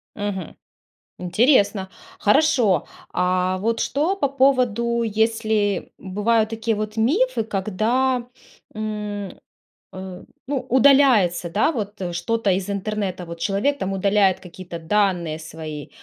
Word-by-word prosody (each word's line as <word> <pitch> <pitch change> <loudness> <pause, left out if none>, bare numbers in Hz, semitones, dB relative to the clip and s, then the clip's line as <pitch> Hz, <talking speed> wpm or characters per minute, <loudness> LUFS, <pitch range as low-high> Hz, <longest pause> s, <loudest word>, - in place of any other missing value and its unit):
Мгм. 205 -4 -4 0.7
Интересно! 200 +1 +2 0.3
Хорошо, 255 - +3 0.3
а 185 +1 +1
вот 225 +4 -1
что 305 +8 0
по 375 -8 0
поводу, 250 -4 +2
если 220 -2 0
бывают 215 +3 +1
такие 225 0 -1
вот 215 +1 -4
мифы, 330 - +2
когда, 225 +5 0 0.5
м, 210 -2 -4 0.6
э, 185 -1 -8 0.2
ну, 285 0 -1
удаляется, 245 -10 +4
да, 215 - +2
вот, 210 -7 -5
э, 175 -2 -3
что-то 225 +3 0
из 185 +1 -1
интернета. 200 -2 -3
Вот 170 0 -8
человек 205 +11 0
там 190 -7 -3
удаляет 195 0 +2
какие-то 180 -1 -9
данные 175 -3 0
свои 155 -2 -8
210 Hz, 115 wpm, -22 LUFS, 185-235 Hz, 0.7 s, удаляется